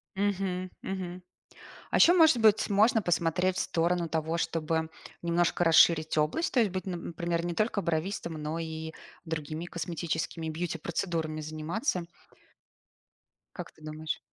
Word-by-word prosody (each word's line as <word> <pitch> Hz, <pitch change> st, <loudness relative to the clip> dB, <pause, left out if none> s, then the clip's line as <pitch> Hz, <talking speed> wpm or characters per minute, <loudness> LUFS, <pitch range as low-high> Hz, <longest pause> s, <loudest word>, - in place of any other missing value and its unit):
Мгм, 190 Hz, -2 st, -1 dB
мгм. 185 Hz, -1 st, -5 dB, 0.7 s
А -, -, +1 dB
ещё, 345 Hz, -, +7 dB
может 320 Hz, -7 st, +6 dB
быть, 220 Hz, -2 st, +4 dB
можно 215 Hz, +3 st, +4 dB
посмотреть 175 Hz, 0 st, +1 dB
в -, -, 0 dB
сторону 170 Hz, +1 st, 0 dB
того, 160 Hz, +1 st, -1 dB
чтобы 160 Hz, -1 st, -1 dB, 0.3 s
немножко 170 Hz, +1 st, +1 dB
расширить 160 Hz, -1 st, +5 dB
область. 155 Hz, -, +1 dB
То 250 Hz, -, +4 dB
есть 215 Hz, -, +2 dB
быть, 185 Hz, 0 st, -4 dB
н 175 Hz, -2 st, -4 dB
например, 170 Hz, 0 st, -2 dB
не 175 Hz, -, -2 dB
только 215 Hz, +2 st, +1 dB
бровистом, 170 Hz, 0 st, -2 dB
но 155 Hz, +1 st, -4 dB
и 160 Hz, -1 st, -5 dB, 0.3 s
другими 160 Hz, 0 st, -4 dB
косметическими 165 Hz, -1 st, -3 dB
бьюти-процедурами 165 Hz, -1 st, -3 dB
заниматься. 160 Hz, -, -2 dB, 1.5 s
Как -, -, -7 dB
ты -, -, -24 dB
думаешь? 155 Hz, 0 st, -4 dB
170 Hz, 135 wpm, -29 LUFS, 160-185 Hz, 1.5 s, ещё